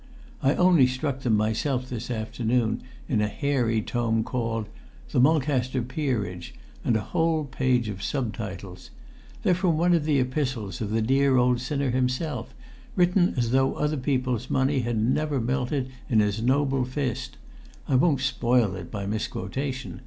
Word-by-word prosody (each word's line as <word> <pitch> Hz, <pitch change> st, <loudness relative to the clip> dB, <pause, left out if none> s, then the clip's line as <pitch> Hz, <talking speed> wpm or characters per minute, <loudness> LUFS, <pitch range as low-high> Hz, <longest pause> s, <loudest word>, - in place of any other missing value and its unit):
I 135 Hz, +3 st, +3 dB
only 175 Hz, -8 st, +5 dB
struck 130 Hz, +1 st, -2 dB
them 115 Hz, -5 st, +2 dB
myself 125 Hz, +5 st, 0 dB
this 120 Hz, -1 st, -5 dB
afternoon, 115 Hz, 0 st, -1 dB, 0.3 s
in 110 Hz, -5 st, +1 dB
a 105 Hz, -, +2 dB
hairy 115 Hz, -2 st, 0 dB
tome 115 Hz, -1 st, 0 dB
called 115 Hz, -3 st, -2 dB, 0.4 s
'The -, -, +2 dB
Mulcaster 130 Hz, -3 st, +2 dB
Peerage' 120 Hz, -, -3 dB, 0.3 s
and 115 Hz, -, +2 dB
a -, -, -2 dB
whole 160 Hz, -, 0 dB
page 130 Hz, -3 st, +1 dB
of 100 Hz, -2 st, -5 dB
sub 125 Hz, -4 st, -2 dB
titles. 95 Hz, -4 st, -7 dB, 0.5 s
They're 180 Hz, -, +4 dB
from 175 Hz, -3 st, +1 dB
one 175 Hz, +2 st, +3 dB
of 165 Hz, -3 st, +2 dB
the 150 Hz, -2 st, +2 dB
epistles 125 Hz, -, -2 dB
of 105 Hz, -, -2 dB
the 110 Hz, +1 st, +1 dB
dear 135 Hz, +2 st, +3 dB
old 125 Hz, -1 st, +3 dB
sinner 140 Hz, 0 st, -1 dB
himself, 130 Hz, +5 st, -1 dB, 0.4 s
written 180 Hz, 0 st, +3 dB
as 120 Hz, -2 st, +1 dB
though 135 Hz, +1 st, +2 dB
other 150 Hz, +1 st, 0 dB
people's 130 Hz, -3 st, -1 dB
money 135 Hz, +1 st, +2 dB
had 120 Hz, -2 st, -1 dB
never 140 Hz, +5 st, +1 dB
melted 130 Hz, +2 st, -1 dB, 0.2 s
in 115 Hz, -, +4 dB
his 105 Hz, +1 st, +1 dB
noble 135 Hz, +1 st, +2 dB
fist. 130 Hz, -, -3 dB, 0.5 s
I -, -, -1 dB
won't 140 Hz, +1 st, +3 dB
spoil 120 Hz, -6 st, +2 dB
it 90 Hz, -3 st, -8 dB
by 100 Hz, -2 st, -4 dB
misquotation. 125 Hz, +6 st, -4 dB
125 Hz, 160 wpm, -26 LUFS, 115-140 Hz, 0.5 s, only